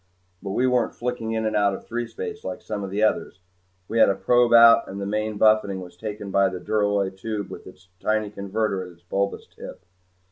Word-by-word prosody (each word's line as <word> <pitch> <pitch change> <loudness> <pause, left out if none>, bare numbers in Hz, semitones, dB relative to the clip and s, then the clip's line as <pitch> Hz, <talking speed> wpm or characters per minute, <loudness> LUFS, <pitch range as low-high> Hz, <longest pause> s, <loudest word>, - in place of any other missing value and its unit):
But 95 -1 -5
we 125 - +1
weren't 125 -2 +1
flicking 120 -2 -3
in 110 0 -1
and 110 - -1
out 100 -1 +2
of - - -11
threespace 430 - -5
like - - -6
some 105 -2 -4
of 100 - -4
the 100 +3 -1
others. 110 -3 0 0.5
We 115 - -1
had 110 - +7
a 100 - +1
probe 120 +4 +3
out 115 0 +7
and 100 - -7
the 100 - -3
main 105 +1 -2
buffeting 110 -3 +3
was 90 -1 -10
taken 105 +1 -6
by 100 0 +3
the 90 -1 -6
duralloy 100 -1 0
tube 105 0 -5
with - - -9
its 90 -1 -15
tiny 110 -1 0
converter 100 0 -2
at 90 -1 -11
its 85 +1 -26
bulbous 100 +3 -2
tip. - - -12
105 Hz, 215 wpm, -24 LUFS, 100-110 Hz, 0.5 s, had